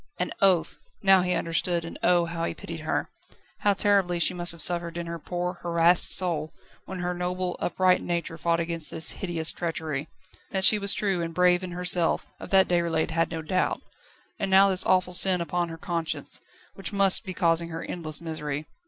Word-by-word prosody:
An -, -, -2 dB
oath! 190 Hz, -4 st, +2 dB, 0.2 s
Now 195 Hz, -1 st, +6 dB
he 180 Hz, 0 st, 0 dB
understood, 170 Hz, +1 st, -1 dB
and 165 Hz, -, -9 dB
oh! 175 Hz, -1 st, +3 dB
how 170 Hz, 0 st, -5 dB
he -, -, -4 dB
pitied -, -, -8 dB
her. -, -, -3 dB, 0.5 s
How 205 Hz, -1 st, +2 dB
terribly 195 Hz, -4 st, +2 dB
she 170 Hz, -, +2 dB
must 175 Hz, 0 st, 0 dB
have 170 Hz, -, -7 dB
suffered 170 Hz, +1 st, -1 dB
in 170 Hz, -, -4 dB
her 170 Hz, 0 st, -6 dB
poor, 175 Hz, +2 st, -4 dB
harassed 170 Hz, 0 st, +3 dB
soul 160 Hz, -4 st, 0 dB, 0.3 s
when 185 Hz, -1 st, -7 dB
her 180 Hz, 0 st, -2 dB
noble, 180 Hz, 0 st, -3 dB
upright 185 Hz, 0 st, +1 dB
nature 170 Hz, -1 st, -3 dB
fought 170 Hz, 0 st, 0 dB
against 165 Hz, -2 st, -2 dB
this 160 Hz, -, 0 dB
hideous 170 Hz, -4 st, -1 dB
treachery. 160 Hz, -4 st, -4 dB, 0.4 s
That 190 Hz, -1 st, -1 dB
she 210 Hz, +2 st, +6 dB
was 200 Hz, 0 st, +2 dB
true 195 Hz, -4 st, -1 dB
and 165 Hz, -1 st, -5 dB
brave 180 Hz, 0 st, +3 dB
in 180 Hz, -1 st, -6 dB
herself, 180 Hz, -1 st, +1 dB
of -, -, -9 dB
that 190 Hz, -1 st, +4 dB
Déroulède 170 Hz, -2 st, 0 dB
had 165 Hz, +1 st, 0 dB
no 160 Hz, -1 st, -5 dB
doubt. 185 Hz, +4 st, -1 dB, 0.6 s
And 195 Hz, -, -2 dB
now 195 Hz, +1 st, +5 dB
this 185 Hz, -, +2 dB
awful 185 Hz, -1 st, +2 dB
sin 185 Hz, 0 st, +6 dB
upon 175 Hz, 0 st, -2 dB
her 165 Hz, -, -8 dB
conscience, 165 Hz, -1 st, -3 dB, 0.3 s
which 195 Hz, +1 st, -4 dB
must 195 Hz, -1 st, +4 dB
be 185 Hz, -4 st, -7 dB
causing 170 Hz, -1 st, +1 dB
her 165 Hz, 0 st, -6 dB
endless 155 Hz, -4 st, -4 dB
misery. 155 Hz, -2 st, -5 dB
175 Hz, 195 wpm, -26 LUFS, 165-185 Hz, 0.6 s, Now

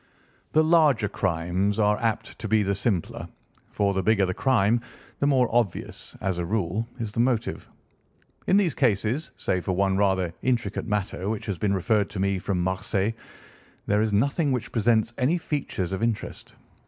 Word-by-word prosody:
The 155 Hz, -, +5 dB
larger 155 Hz, -9 st, +4 dB
crimes 95 Hz, +2 st, -1 dB
are 105 Hz, -1 st, +2 dB
apt 115 Hz, -1 st, -2 dB
to 110 Hz, -, -4 dB
be 110 Hz, 0 st, +3 dB
the 100 Hz, 0 st, 0 dB
simpler, 100 Hz, -3 st, -2 dB, 0.4 s
for 100 Hz, -1 st, 0 dB
the 95 Hz, -, 0 dB
bigger 100 Hz, 0 st, +3 dB
the 90 Hz, -, -2 dB
crime 115 Hz, -1 st, +2 dB, 0.4 s
the 140 Hz, -, +2 dB
more 130 Hz, -4 st, +4 dB
obvious, 115 Hz, -7 st, -1 dB
as 95 Hz, -2 st, -1 dB
a -, -, -1 dB
rule, 105 Hz, +3 st, -1 dB
is 110 Hz, -3 st, -3 dB
the 110 Hz, -, -4 dB
motive. 120 Hz, -2 st, 0 dB, 0.8 s
In 190 Hz, -, +5 dB
these 190 Hz, -6 st, +2 dB
cases, 120 Hz, +3 st, +1 dB
save 90 Hz, -1 st, -1 dB
for 95 Hz, -, -1 dB
one 95 Hz, +1 st, +1 dB
rather 95 Hz, -4 st, +1 dB
intricate 115 Hz, -6 st, -1 dB
matter 105 Hz, -2 st, -2 dB
which 110 Hz, -2 st, -3 dB
has 95 Hz, -5 st, -3 dB
been 100 Hz, -1 st, +1 dB
referred 105 Hz, +2 st, +1 dB
to 100 Hz, -, -6 dB
me 100 Hz, 0 st, +1 dB
from 90 Hz, -1 st, -1 dB
Marseilles, 95 Hz, +3 st, -1 dB, 0.7 s
there 105 Hz, +1 st, +2 dB
is 110 Hz, -1 st, +1 dB
nothing 140 Hz, -, +1 dB
which 120 Hz, -3 st, -2 dB
presents 115 Hz, 0 st, +2 dB
any 140 Hz, +7 st, +2 dB
features 140 Hz, -, -3 dB
of 95 Hz, -, -3 dB
interest. 115 Hz, -2 st, -3 dB
105 Hz, 175 wpm, -25 LUFS, 95-120 Hz, 0.8 s, The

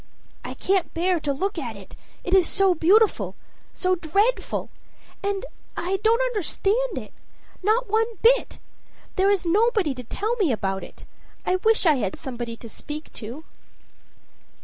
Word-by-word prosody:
"I -, -, -6 dB
can't 380 Hz, -2 st, +1 dB
bear 355 Hz, +1 st, +2 dB
to 295 Hz, -2 st, -1 dB
look 370 Hz, +6 st, -2 dB
at 235 Hz, -7 st, -5 dB
it, 195 Hz, -1 st, -12 dB, 0.3 s
it 365 Hz, -, -2 dB
is 375 Hz, -3 st, +5 dB
so 390 Hz, -2 st, +4 dB
beautiful 390 Hz, +7 st, +3 dB, 0.4 s
so 370 Hz, 0 st, 0 dB
dreadful. 395 Hz, +9 st, 0 dB, 0.5 s
And 400 Hz, +2 st, -2 dB, 0.3 s
I 380 Hz, +2 st, -1 dB
don't 455 Hz, +2 st, +4 dB
understand 470 Hz, +1 st, 0 dB
it -, -, -7 dB, 0.5 s
not 440 Hz, +6 st, +2 dB
one 445 Hz, +2 st, +1 dB
bit. -, -, +4 dB, 0.6 s
There 385 Hz, +1 st, +3 dB
is 400 Hz, -3 st, +2 dB
nobody 415 Hz, -, +2 dB
to 250 Hz, -1 st, -8 dB
tell 425 Hz, -, -2 dB
me 375 Hz, -, +2 dB
about 195 Hz, -4 st, -2 dB
it. -, -, -12 dB, 0.4 s
I 365 Hz, -, +2 dB
wish 440 Hz, +2 st, +2 dB
I 310 Hz, -4 st, +5 dB
had 200 Hz, -6 st, -2 dB
somebody 240 Hz, -3 st, -5 dB
to 230 Hz, -, -10 dB
speak 295 Hz, +6 st, -8 dB
to." 240 Hz, +8 st, -7 dB
370 Hz, 150 wpm, -24 LUFS, 295-430 Hz, 0.6 s, is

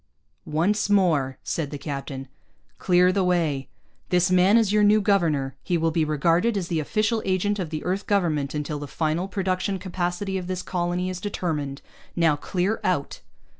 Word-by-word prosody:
"Once 195 Hz, +8 st, +1 dB
more," 160 Hz, -10 st, +2 dB
said 155 Hz, -4 st, -2 dB
the 145 Hz, -, -5 dB
captain, 140 Hz, -2 st, -6 dB, 0.5 s
"clear 180 Hz, 0 st, +4 dB
the 195 Hz, 0 st, +1 dB
way. 160 Hz, -7 st, 0 dB, 0.4 s
This 180 Hz, +1 st, +2 dB
man 185 Hz, +4 st, +5 dB
is 220 Hz, -4 st, +3 dB
your 210 Hz, 0 st, +4 dB
new 210 Hz, +1 st, +5 dB
governor. 165 Hz, -, +1 dB
He 175 Hz, -, 0 dB
will 165 Hz, 0 st, +1 dB
be 160 Hz, 0 st, +1 dB
regarded 165 Hz, +8 st, +2 dB
as 180 Hz, -3 st, -3 dB
the 165 Hz, -3 st, 0 dB
official 215 Hz, +8 st, 0 dB
agent 195 Hz, +2 st, 0 dB
of 175 Hz, -4 st, -3 dB
the 155 Hz, -1 st, -4 dB
Earth 190 Hz, +3 st, -2 dB
Government 155 Hz, -8 st, 0 dB
until 150 Hz, 0 st, -3 dB
the 145 Hz, -, -6 dB
final 160 Hz, +5 st, -1 dB
production 190 Hz, 0 st, -1 dB
capacity 185 Hz, +1 st, -2 dB
of 180 Hz, -, -7 dB
this 185 Hz, -1 st, -3 dB
colony 180 Hz, +1 st, -1 dB
is 180 Hz, -1 st, -6 dB
determined. 150 Hz, -8 st, -3 dB, 0.3 s
Now 165 Hz, -3 st, +3 dB
clear 185 Hz, +7 st, -1 dB
out." 180 Hz, -6 st, -1 dB
180 Hz, 170 wpm, -24 LUFS, 155-195 Hz, 0.5 s, man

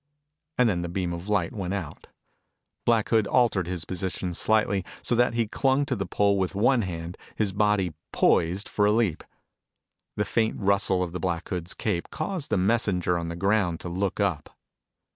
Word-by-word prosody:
And 125 Hz, -, +5 dB
then 90 Hz, -5 st, 0 dB
the 85 Hz, -, -4 dB
beam 90 Hz, -1 st, -2 dB
of 85 Hz, +4 st, -7 dB
light 100 Hz, -5 st, +1 dB
went 95 Hz, -2 st, -3 dB
out. 85 Hz, -6 st, -7 dB, 0.8 s
Black 115 Hz, -3 st, +2 dB
Hood 110 Hz, -3 st, +3 dB
altered 115 Hz, -8 st, +2 dB
his 90 Hz, -3 st, -3 dB
position 90 Hz, -1 st, -3 dB
slightly 105 Hz, 0 st, +2 dB, 0.2 s
so -, -, +1 dB
that 120 Hz, 0 st, +3 dB
he 115 Hz, -2 st, +1 dB
clung 135 Hz, +5 st, +1 dB
to 130 Hz, -, -1 dB
the 95 Hz, -4 st, -3 dB
pole 100 Hz, +1 st, +2 dB
with 95 Hz, 0 st, -1 dB
one 120 Hz, +4 st, +3 dB
hand, 85 Hz, -3 st, -5 dB, 0.2 s
his 105 Hz, -3 st, 0 dB
body 105 Hz, -4 st, +1 dB, 0.2 s
poised 90 Hz, +5 st, +2 dB
for 105 Hz, -, +1 dB
a -, -, +4 dB
leap. 105 Hz, -7 st, +1 dB, 0.9 s
The 105 Hz, -, 0 dB
faint 110 Hz, -1 st, 0 dB
rustle 100 Hz, -2 st, +2 dB
of 90 Hz, -, -4 dB
the 90 Hz, -, -4 dB
Black 85 Hz, -3 st, -2 dB
Hood's 90 Hz, -2 st, -4 dB
cape 90 Hz, -6 st, -2 dB
caused 155 Hz, -1 st, -4 dB
the -, -, +1 dB
messenger 95 Hz, -3 st, +1 dB
on 85 Hz, -, -4 dB
the 85 Hz, -, -4 dB
ground 95 Hz, -2 st, +1 dB
to 90 Hz, -, -5 dB
look 95 Hz, +3 st, -2 dB
up. 95 Hz, -8 st, -1 dB
95 Hz, 185 wpm, -26 LUFS, 90-110 Hz, 0.9 s, And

